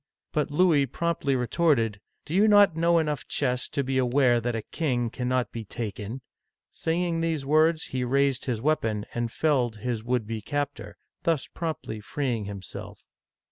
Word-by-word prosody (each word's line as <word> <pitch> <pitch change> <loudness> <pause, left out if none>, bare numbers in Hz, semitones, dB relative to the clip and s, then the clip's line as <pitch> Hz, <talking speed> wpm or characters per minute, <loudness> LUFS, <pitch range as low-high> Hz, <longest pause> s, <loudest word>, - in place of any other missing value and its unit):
But 150 - 0
Louis 150 -3 +3
promptly 150 -1 -1
retorted, 125 - +1
" - - -49
Do 155 - -6
you 205 +4 +5
not 205 -5 +6
know 170 +1 +3
enough 150 -3 -1
chess 125 -3 0
to 140 - -1
be 130 0 0
aware 125 -1 +3
that 120 0 -1
a 110 - -3
king 125 -8 -1
cannot 125 0 -1
be 115 - -5
taken! 110 +3 -5 0.2
" - - -59
Saying 165 0 -1
these 160 -4 -1
words, 155 +2 +3
he 130 -1 -3
raised 135 +1 +1
his 120 -4 -2
weapon 110 -9 +1
and 120 -1 -2
felled 130 -7 +1
his 110 +1 -3
would 120 -1 0
be 110 0 -4
captor, 145 +3 -4 0.2
thus 165 -5 +1
promptly 160 -9 -5
freeing 120 -1 -2
himself. 100 -3 -8
135 Hz, 170 wpm, -27 LUFS, 120-155 Hz, 0.2 s, not